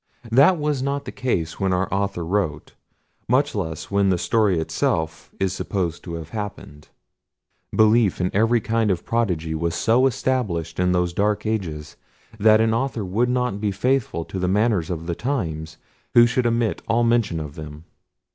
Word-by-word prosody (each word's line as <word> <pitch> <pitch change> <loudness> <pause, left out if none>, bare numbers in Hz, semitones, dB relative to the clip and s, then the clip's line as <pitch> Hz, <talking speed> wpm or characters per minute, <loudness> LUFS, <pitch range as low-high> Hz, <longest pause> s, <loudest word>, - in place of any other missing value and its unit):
That 140 +10 +6
was 150 -3 -1
not 140 +1 -2
the - - -6
case 115 -12 -2
when 95 -1 +1
our 90 +1 0
author 100 -3 -1
wrote; 85 -5 -2 0.6
much 140 +4 +2
less 80 -4 -4
when 100 -1 +3
the 90 - +2
story 105 0 +2
itself 80 0 -1
is 95 -1 0
supposed 90 -4 -3
to 85 -2 -6
have 80 -1 -7
happened. 95 - -7 0.8
Belief 110 -2 +3
in 90 0 0
every 115 +3 +3
kind 110 0 0
of 90 -3 -1
prodigy 90 -9 -1
was 85 +1 -1
so 120 +4 +3
established 105 -12 -2
in 90 0 +2
those 90 -1 +1
dark 105 +3 0
ages, 85 -9 -3 0.4
that 110 +1 +6
an 110 0 +2
author 115 -3 -1
would 110 +7 0
not 125 -5 -1
be 105 - +1
faithful 110 -5 0
to 95 - -6
the 90 - 0
manners 100 -3 +1
of 85 -2 -4
the 85 - -2
times, 80 - -3 0.4
who 120 0 +8
should 120 +1 +1
omit 115 -1 0
all 115 +1 +2
mention 115 -8 +1
of 75 -2 -6
them. 75 0 -9
100 Hz, 175 wpm, -22 LUFS, 85-115 Hz, 0.8 s, who